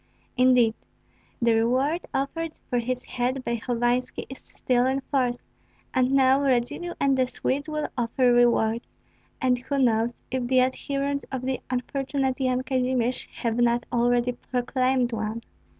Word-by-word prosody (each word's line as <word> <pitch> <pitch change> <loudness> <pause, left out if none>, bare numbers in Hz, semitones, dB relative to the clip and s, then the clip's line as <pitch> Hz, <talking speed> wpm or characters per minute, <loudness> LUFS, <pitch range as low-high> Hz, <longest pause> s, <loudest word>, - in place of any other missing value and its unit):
Indeed, 250 -3 +4 0.7
the 235 -1 +3
reward 260 +9 +1
offered 315 +4 -3
for 245 - 0
his 250 +1 -3
head 255 +1 -2
by 235 0 0
Hovanski 240 +1 -1
is 265 - -8
still 250 0 0
in 265 +1 0
force, 255 -3 -1 0.5
and 255 -1 +2
now 270 0 +4
Radzivill 275 +6 0
and 275 -1 +3
the 260 -1 +2
Swedes 285 +4 -2
will 305 0 -2
offer 245 0 +2
rewards, 235 -1 +2 0.4
and 250 -1 +2
who 280 +3 -3
knows 235 -2 +1
if 255 -1 -1
the 255 0 +4
adherents 275 +2 -1
of 260 -2 -3
the 260 0 -2
unfortunate 265 +1 -1
Yan 255 -1 +1
Kazimir 255 -2 +1 0.3
have 230 -1 0
not 240 0 +2
already 240 +1 +2
proclaimed 255 0 0
one? 220 +1 -3
255 Hz, 145 wpm, -25 LUFS, 240-265 Hz, 0.7 s, Indeed